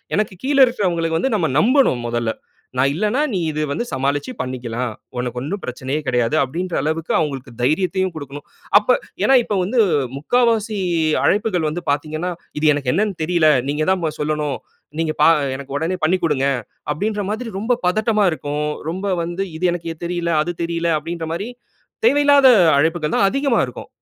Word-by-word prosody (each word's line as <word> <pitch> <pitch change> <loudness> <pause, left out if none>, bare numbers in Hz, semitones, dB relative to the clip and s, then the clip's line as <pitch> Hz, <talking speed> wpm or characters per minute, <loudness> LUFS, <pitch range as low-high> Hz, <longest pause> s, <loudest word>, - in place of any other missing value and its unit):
எனக்கு 210 -2 0
கீழ 280 +1 +1
இருக்கிறவங்களுக்கு 170 -9 0
வந்து 265 - 0
நம்ம 175 -6 +1
நம்பணும் 250 - +3
முதல்ல. 120 -1 -1 0.5
நான் 135 +2 +3
இல்லன்னா 215 - 0
நீ 190 - 0
இத 155 0 -2
வந்து 235 - -2
சமாளிச்சு 140 - -1
பண்ணிக்கலாம். 125 -2 -4 0.3
உனக்கு 125 0 -3
ஒண்ணும் 185 +9 -4
பிரச்சனையே 130 +4 -3
கிடையாது. 125 +2 +1
அப்படின்ற 170 +7 -4
அளவுக்கு 160 +2 -2
அவங்களுக்கு 135 -5 -3
தைரியத்தையும் 185 +6 +1
கொடுக்கணும். 145 -1 -8 0.3
அப்ப 210 - -13 0.3
ஏன்னா, 270 - +5
இப்போ 210 - -2
வந்து 225 +7 0 0.4
முக்காவாசி 225 - +1 0.5
அழைப்புகள் 200 -6 +1
வந்து 175 +3 -4
பார்த்தீங்கன்னா, 155 +5 -2 0.3
இது 155 0 +4
எனக்கு 140 -3 -1
என்னன்னு 205 -1 0
தெரியல. 170 -1 +2 0.2
நீங்க 150 +2 0
தான் 190 -1 0
பா 155 - 0
சொல்லணும். 150 -2 -1 0.4
நீங்க 160 -1 0
பா 155 - +7 0.3
எனக்கு 140 0 -7
உடனே 165 +5 -1
பண்ணிக் 180 +2 +1
குடுங்க, 140 -4 +1 0.5
அப்படின்ற 205 +5 -2
மாதிரி 225 +2 -4
ரொம்ப 235 +4 +1
பதட்டமா 215 +2 +2
இருக்கும். 150 -1 -3 0.2
ரொம்ப 190 +2 -2
வந்து 175 +3 -3
இது 180 - -1
எனக்கு 165 -1 -4
தெரியல, 170 -1 -2
அது 175 - -3
தெரியல 170 0 -1
அப்படின்ற 165 +1 -5
மாரி 200 +8 -4 0.6
தேவையில்லாத 285 - +5 0.3
அழைப்புகள் 160 +1 +1
தான் 195 - +4
அதிகமா 275 -2 +1
இருக்கும். - - -10
165 Hz, 160 wpm, -20 LUFS, 145-205 Hz, 0.6 s, பா